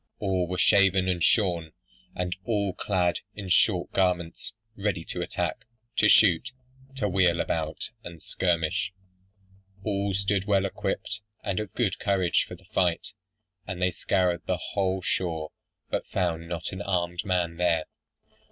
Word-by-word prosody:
All 95 -3 0
were 90 +1 -3
shaven 95 0 +4
and 90 -2 0
shorn; 85 -7 +2 0.4
and 90 0 -2
all 100 -4 0
clad 90 -3 +1 0.2
in 100 -3 -6
short 90 0 +3
garments, 90 -2 0 0.2
ready 100 -4 -1
to - - -4
attack, - - -2 0.3
to 105 - +5
shoot, 105 +5 +5 0.4
to 105 -6 0
wheel 90 -3 +3
about 80 +5 -2
and 85 -1 -9
skirmish. 90 +1 0 0.9
All 100 -2 0
stood 100 0 +1
well 100 -2 +3
equipped, 105 +2 -3 0.2
and 100 -1 -1
of 105 -2 -4
good 100 -6 0
courage 95 -3 +2
for 90 - -8
the 95 +2 -20
fight; 95 0 0 0.6
and 95 -2 -4
they 90 0 +2
scoured 90 0 +1
the 90 - +1
whole 95 -1 -1
shore, 80 -4 -1 0.4
but - - -1
found 85 -3 -1
not 85 -1 -3
an 95 - -5
armed 90 -3 -1
man 90 -3 0
there. 85 -3 +2
90 Hz, 145 wpm, -27 LUFS, 85-100 Hz, 0.9 s, to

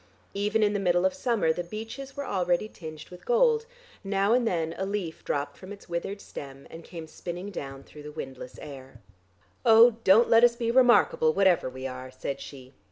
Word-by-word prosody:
Even 210 +2 +1
in 210 0 +2
the 205 - 0
middle 175 -1 +2
of 190 - +2
summer 235 -12 +1
the 175 - -4
beeches 225 +9 -8
were 280 - -3
already 180 -2 0
tinged 155 -6 -10
with 180 - -13
gold; 470 -2 +2 0.4
now 195 +2 +1
and 245 -1 +2
then 165 -4 -1
a - - -1
leaf 195 -4 -4
dropped 145 0 -3
from 190 +1 -10
its 200 - -11
withered 175 +3 -4
stem, 135 -6 -10
and 165 +1 -10
came 165 -2 -9
spinning 175 +4 -7
down 135 -6 -7
through 150 - -13
the 150 0 -9
windless 130 -3 -8
air. 135 -4 -11 0.6
"Oh, 230 -1 +7
don't 215 +5 +6
let 230 +1 +5
us 240 -1 +6
be 230 -1 -1
remarkable 240 -10 +4
whatever 190 -8 +3
we 130 +1 -8
are," 130 0 -6
said 130 +1 -5
she. 130 -2 -11
185 Hz, 195 wpm, -27 LUFS, 155-225 Hz, 0.6 s, Oh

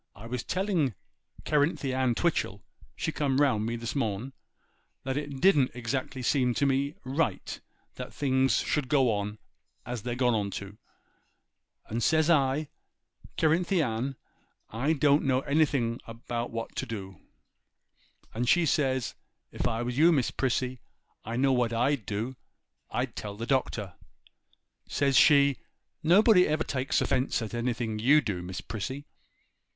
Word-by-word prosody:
I 105 - -11
was 120 +1 -3
telling 180 - 0 0.5
Cerinthy 145 -2 +1
Ann 130 -2 +1
Twitchel, 105 - -1 0.3
she - - -2
come 135 -2 0
round 115 -7 +2
me 115 - -2
this 115 +2 -5
noon, 115 0 -2 0.7
that 130 0 -2
it 145 -2 -4
didn't 150 -8 +4
exactly 130 +2 -3
seem 125 -2 +2
to 140 - +1
me 140 +2 +1
right 130 - -2 0.4
that - - -6
things 135 -1 +2
should 145 -4 -1
go 135 -4 +4
on 105 +1 -3 0.5
as 120 -2 -4
they're 120 +2 -3
gone 120 -5 +1
to; 100 +1 -8 1.1
and 115 +2 -3
says 160 +5 +3
I, 145 0 +2 0.7
"Cerinthy 170 +2 +2
Ann, 125 +2 -2 0.6
I 135 +8 +1
don't 145 0 +3
know 130 -1 +2
anything 140 -5 +1 0.3
what 115 -1 -4
to - - -2
do." 95 -5 -7 1.1
And 120 +2 -1
says 175 -4 +4
she, 130 -4 0 0.4
"If - - -1
I 115 +1 -1
was 125 +2 -3
you, 165 +2 +7
Miss 135 -7 +1
Prissy, 130 -1 -1 0.4
I 115 +2 -5
know 135 +2 +3
what 120 -2 +1
I'd 120 -2 0
do; 115 +6 -3 0.5
I'd - - -2
tell 100 -1 -6
the 115 - -4
Doctor." 115 -7 -1 0.9
Says 140 -1 +1
she, 140 -2 +6 0.4
"Nobody 180 +3 +5
ever 155 +1 0
takes 130 -1 -1
offence 130 0 +1
at 110 - -7
anything 120 -2 -2
you 140 +7 +5
do, 100 -10 -3
Miss 90 +1 -6
Prissy." 130 +7 -5
130 Hz, 145 wpm, -28 LUFS, 115-145 Hz, 1.1 s, you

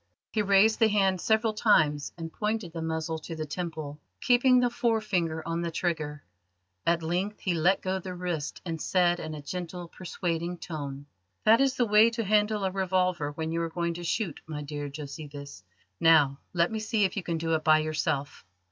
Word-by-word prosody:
He 215 - +1
raised 200 +2 +4
the 225 - +6
hand 195 -4 +2
several 220 0 +2
times, 155 -10 +3
and 165 -1 -6
pointed 210 -5 -2
the 165 - -4
muzzle 160 0 -2
to 165 +1 -7
the 155 -1 -4
temple, 155 -2 -5 0.2
keeping 250 0 +4
the 245 -1 +2
forefinger 205 -10 0
on 165 0 -1
the 170 - -2
trigger. 155 -4 -2 0.6
At 170 0 +2
length 185 +6 -2
he 185 - 0
let 175 +4 +2
go 190 0 -1
the 185 0 -7
wrist, 175 -5 -4
and 165 -3 -4
said 175 -2 +2
in 155 0 -5
a 150 - -8
gentle, 175 +2 -5
persuading 175 -1 -3
tone: 145 -5 -6 0.4
"That 225 +4 +6
is 270 -1 +2
the 245 - +2
way 215 +1 +6
to 230 - 0
handle 210 0 +2
a 190 - 0
revolver 185 -5 0
when 160 +1 -3
you 165 +1 -1
are 165 - -2
going 170 0 -2
to 175 +1 -7
shoot, 175 -1 -2
my 150 -2 -5
dear 145 0 -5
Josephus. 140 - -8 0.4
Now, 150 -4 +5
let 170 +1 +1
me 220 - -2
see 215 0 0
if 190 - +1
you 200 - -1
can 170 -2 -2
do 165 0 -1
it 155 -1 0
by 155 -1 +6
yourself." 155 -3 -2
170 Hz, 195 wpm, -28 LUFS, 155-200 Hz, 0.6 s, the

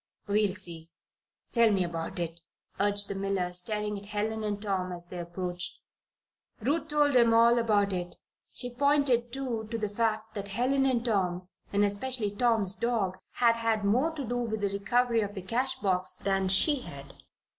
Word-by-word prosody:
"We'll 205 -1 +1
see. 170 -5 -2 0.6
Tell 235 -2 +5
me 195 -2 +2
about 165 0 -4
it," 170 -1 -3 0.4
urged 205 0 +3
the - - -2
miller, 195 -2 -2
staring 210 +3 0
at 200 - -9
Helen 215 +1 -2
and 205 -1 -2
Tom 190 -3 -2
as 175 -1 -7
they 175 0 -8
approached. 175 +1 -3 0.8
Ruth 290 +9 -1
told 295 -2 +2
him 235 -2 +5
all 235 +1 +5
about 205 -3 +2
it. 175 -1 -4 0.4
She 245 -1 -1
pointed, 265 -3 +2
too, 240 -4 -3
to 230 - -2
the 210 -2 -2
fact 220 0 -1
that 200 -2 -5
Helen 260 +6 +1
and 245 -2 0
Tom 185 -5 -1 0.2
and 205 0 +2
especially 210 +1 0
Tom's 215 -3 +3
dog 200 -5 -1
had 235 -1 +3
had 225 -2 0
more 250 +10 +2
to 285 -4 -4
do 245 +1 -2
with 220 -3 -2
the 200 - +1
recovery 230 +4 +1
of 205 0 -4
the 190 - -5
cash 245 +7 +1
box 185 -2 0
than 195 -1 -1
she 275 - +4
had. 140 - -10
210 Hz, 175 wpm, -29 LUFS, 190-235 Hz, 0.8 s, Tell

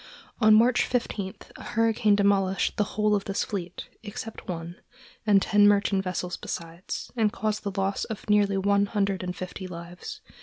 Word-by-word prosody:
On 215 -2 +7
March 235 +3 +5
15 205 -6 -2 0.2
a - - -10
hurricane 225 -2 +2
demolished 195 -1 +2
the 210 - +2
whole 210 0 +3
of 200 -1 0
this 195 - -1
fleet, 180 -4 -5
except 225 +1 -8
one, 170 0 -5 0.5
and 200 -2 +5
ten 205 -1 +5
merchant 200 -1 +3
vessels 180 -1 -3
besides, 170 +2 -6
and 220 -3 +2
caused 215 +1 -2
the 200 -1 -4
loss 195 +1 0
of 220 -1 -7
nearly 205 -1 +3
one 200 +1 +2
hundred 200 -2 0
and 180 -1 -4
fifty 185 +1 -6
lives. 170 0 -8
200 Hz, 165 wpm, -27 LUFS, 185-210 Hz, 0.5 s, On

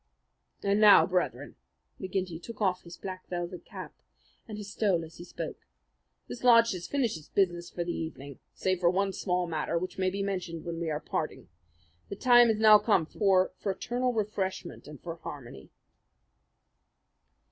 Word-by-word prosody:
And 200 +1 +2
now, 210 -1 +8
Brethren," 180 -1 -2 0.4
McGinty 185 -3 -3
took 230 +4 -9
off 185 -4 +1
his 170 0 -12
black 185 -1 -7
velvet 175 0 -5
cap - - -9 0.5
and 215 -2 -7
his 205 -1 -7
stole 190 -6 +1
as 160 - -15
he 175 - -9
spoke, 175 - -7 0.6
"this 245 - -8
lodge 230 -2 +6
has 180 -2 -5
finished 240 - -1
its 150 - -18
business 175 -3 0
for 175 - -3
the 170 0 -3
evening, 140 -4 -7 0.2
save 185 -1 0
for 175 -1 +4
one 195 +2 0
small 180 -2 -1
matter 165 0 -2
which 185 +2 -4
may 185 0 +2
be 200 +1 -3
mentioned 180 -4 -4
when 170 -1 -4
we 170 -1 -2
are 150 -1 -1
parting. - - -4 0.6
The - - -4
time 240 +2 +6
has 220 -2 +2
now 215 -1 +8
come 205 -6 +2
for 190 +1 +2
fraternal 245 +6 -1
refreshment 205 -7 -3
and 150 -2 -10
for 170 -1 -7
harmony." 125 - -9
185 Hz, 170 wpm, -29 LUFS, 170-210 Hz, 0.6 s, now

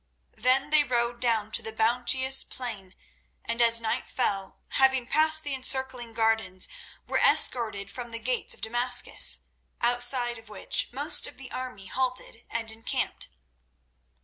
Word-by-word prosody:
Then 265 +3 +1
they 305 -1 +5
rode 240 -2 -1
down 225 -3 0
to - - -1
the 220 - -6
bounteous 250 +4 +4
plain, 210 -7 -7 0.5
and 230 +1 -2
as 230 0 +6
night 220 -1 -3
fell, 195 -1 -3
having 265 -2 +2
passed 315 +4 +2
the 290 - -4
encircling 260 -2 0
gardens, 220 -5 +1 0.4
were - - -1
escorted 215 -5 +2
through 240 +3 -8
the 230 - -6
gates 245 +2 -2
of - - -19
Damascus, 240 +2 +3 0.4
outside 240 0 0
of 225 -1 -17
which 210 - -1
most 285 +6 0
of - - -13
the 270 -2 -10
army 250 -7 -7
halted 255 0 -4
and 225 -1 -1
encamped. 225 +1 -3
240 Hz, 145 wpm, -26 LUFS, 225-255 Hz, 0.5 s, as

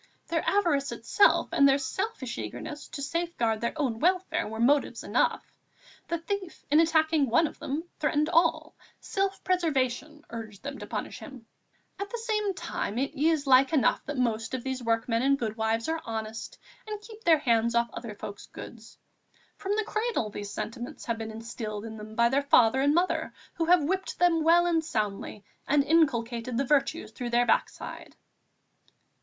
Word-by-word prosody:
Their 330 -1 0
avarice 335 -9 +1
itself 410 - +3
and 280 0 +5
their 270 - +4
selfish 280 - -3
eagerness 295 - -6
to 280 - -6
safeguard 275 -9 -1
their 235 +7 -2
own 245 -6 0
welfare 345 0 +1
were 220 +1 -6
motives 280 +5 +2
enough; - - +1 0.6
the 340 - -1
thief 375 +1 -5
in 300 - +6
attacking 315 -3 +3
one 280 +8 +4
of 300 - -6
them 290 +4 -3 0.2
threatened 300 0 +1
all; 335 0 +2 0.2
self 390 -1 -2
preservation 300 -4 -1
urged 220 -3 -8
them 280 0 -6
to - - -8
punish - - -5
him.... 265 -6 -11 0.5
At 400 0 -4
the 475 - -4
same 425 -4 -1
time, 330 -11 -4
it 275 +3 -1
is 305 0 +1
like 270 +2 +5
enough 290 - +3
the 290 - -5
most 225 -3 0
part 260 - -1
of 240 - -9
these 260 -1 -3
workmen 230 0 0
and 275 +1 +3
goodwives 225 -1 -1
are 320 0 -1
honest 220 0 -5 0.3
and 425 -1 -4
keep 435 +1 -13
their 330 -2 +6
hands 235 -4 +2
off 235 -1 +2
other 230 -3 -7
folk's 200 0 -8
goods. 230 -2 -11 0.6
From 400 +1 -1
the 435 - +1
cradle 435 - -1
these 205 0 -6
sentiments 235 +4 -6
have 230 -1 -2
been 220 0 -4
instilled 220 -1 -6
in 220 -1 -7
them 215 +1 -9
by 235 +1 +4
their 275 +3 +2
father 265 -2 +4
and 285 +2 +3
mother, 355 +2 0 0.2
who 330 - -1
have 350 -1 +5
whipped 380 +5 -2
them 340 -2 +3
well 340 +2 +5
and 330 -2 +2
soundly 210 -7 -3 0.2
and 285 0 +4
inculcated 250 -6 +1
the 275 - +1
virtues 290 +3 +1
through 245 -2 -5
their 240 +1 +3
backside." - - -2
275 Hz, 175 wpm, -28 LUFS, 230-330 Hz, 0.6 s, in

